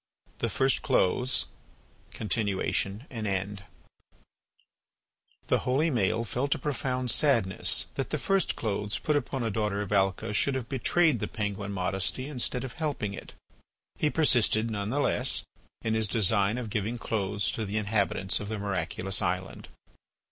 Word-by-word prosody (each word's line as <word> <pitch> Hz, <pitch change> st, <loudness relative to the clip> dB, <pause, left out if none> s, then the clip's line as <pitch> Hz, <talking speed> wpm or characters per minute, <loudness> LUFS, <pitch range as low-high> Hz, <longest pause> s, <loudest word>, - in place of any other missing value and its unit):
THE -, -, 0 dB
FIRST 135 Hz, 0 st, +2 dB
CLOTHES 125 Hz, +8 st, +1 dB, 0.6 s
(Continuation 105 Hz, 0 st, -1 dB
and 110 Hz, -4 st, -4 dB
End) 100 Hz, +1 st, -3 dB, 1.8 s
The -, -, +2 dB
holy 145 Hz, +6 st, +1 dB
Maël 115 Hz, -1 st, +1 dB
felt 135 Hz, +5 st, 0 dB
a -, -, -4 dB
profound 130 Hz, -4 st, -1 dB
sadness 115 Hz, -11 st, +3 dB
that -, -, -3 dB
the -, -, 0 dB
first 195 Hz, -3 st, +1 dB
clothes 105 Hz, -1 st, -1 dB
put 150 Hz, -, 0 dB
upon 135 Hz, -2 st, -1 dB
a 115 Hz, -, -1 dB
daughter 105 Hz, -1 st, -1 dB
of 100 Hz, -, -8 dB
Alca 100 Hz, +2 st, +1 dB
should 135 Hz, +6 st, +3 dB
have 130 Hz, -3 st, -3 dB
betrayed 145 Hz, +1 st, +2 dB
the -, -, -2 dB
penguin 100 Hz, -2 st, -3 dB
modesty 95 Hz, +7 st, +1 dB
instead 125 Hz, -3 st, -1 dB
of 130 Hz, -, -6 dB
helping 145 Hz, -11 st, -2 dB
it. -, -, -9 dB, 0.7 s
He 150 Hz, -, +2 dB
persisted, 120 Hz, -7 st, +3 dB
none 100 Hz, -1 st, -3 dB
the 140 Hz, +5 st, 0 dB
less, -, -, +2 dB, 0.4 s
in 110 Hz, -, 0 dB
his 110 Hz, -1 st, +2 dB
design 105 Hz, +1 st, +2 dB
of 115 Hz, -4 st, -5 dB
giving 110 Hz, +3 st, -2 dB
clothes 105 Hz, -3 st, -1 dB
to 110 Hz, -, -3 dB
the 105 Hz, +1 st, -3 dB
inhabitants 100 Hz, -2 st, +1 dB
of 105 Hz, -, -6 dB
the 110 Hz, -, -3 dB
miraculous 95 Hz, -1 st, -2 dB
island. 90 Hz, -1 st, -3 dB
110 Hz, 150 wpm, -28 LUFS, 100-130 Hz, 1.8 s, sadness